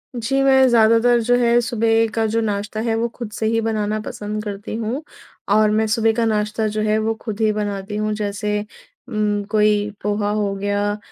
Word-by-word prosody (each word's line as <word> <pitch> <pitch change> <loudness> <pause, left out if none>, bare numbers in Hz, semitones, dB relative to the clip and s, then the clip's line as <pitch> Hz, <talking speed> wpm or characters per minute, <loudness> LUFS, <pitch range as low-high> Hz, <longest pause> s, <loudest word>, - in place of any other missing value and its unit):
जी 255 +4 0
मैं 265 -1 +5
ज़्यादातर 230 +1 +4
जो 245 +2 +2
है 240 -1 +3
सुबह 225 -1 +1
का 225 -1 +1
जो 230 - +2
नाश्ता 210 0 -3
है 225 -1 0
वो 230 +1 0
खुद 235 -4 -6
से 220 - -3
ही 225 +1 +1
बनाना 215 -1 -1
पसंद 210 0 -5
करती 205 0 -6
हूँ 230 +6 -3 0.5
और 215 0 +4
मैं 220 +1 +1
सुबह 225 +1 +2
का 230 - +2
नाश्ता 215 0 0
जो 215 - 0
है 215 0 +1
वो 220 +1 0
खुद 215 -2 -5
ही 215 -1 +3
बनाती 205 -1 -4
हूँ। 215 0 -1
जैसे 210 0 -2 0.5
उम्म, 210 -2 0
कोई 210 -1 +2
पोहा 205 0 0
हो 210 -1 -1
गया 205 +1 -1
215 Hz, 195 wpm, -20 LUFS, 210-225 Hz, 0.5 s, मैं